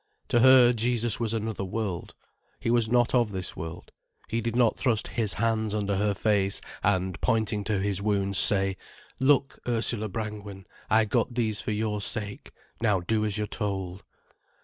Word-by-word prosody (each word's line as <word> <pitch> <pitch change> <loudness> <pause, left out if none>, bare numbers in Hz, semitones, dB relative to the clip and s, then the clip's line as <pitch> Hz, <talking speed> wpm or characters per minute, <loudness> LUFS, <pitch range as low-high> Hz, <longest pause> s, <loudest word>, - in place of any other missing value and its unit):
To 120 - +3
her 125 -1 +7
Jesus 120 -1 0
was 115 -2 0
another 110 -2 -3
world, 95 -2 -4 0.4
He 115 - -1
was 120 -2 +3
not 120 0 +2
of 120 -3 +3
this 95 -3 -5
world. 80 +2 -8 0.4
He 115 +1 -1
did 115 0 -3
not 120 -2 +3
thrust 115 -5 -1
His 110 -4 0
hands 110 -1 -1
under 100 -1 -1
her 100 +1 0
face 100 -1 +1 0.2
and, 95 -2 -1
pointing 110 -2 0
to 105 -1 0
His 100 -1 -1
wounds, 100 -2 +2
say: 95 -1 +6 0.4
"Look, 135 0 +2
Ursula 115 -2 -1
Brangwen, 105 -2 -6 0.2
I 110 0 +4
got 110 +3 -1
these 110 -4 -1
for - - -5
your 105 0 -2
sake. 100 0 -3 0.3
Now 105 -4 +2
do 110 +5 0
as 105 -1 -1
you're 105 - -1
told." 95 -3 -4
105 Hz, 170 wpm, -26 LUFS, 100-115 Hz, 0.4 s, her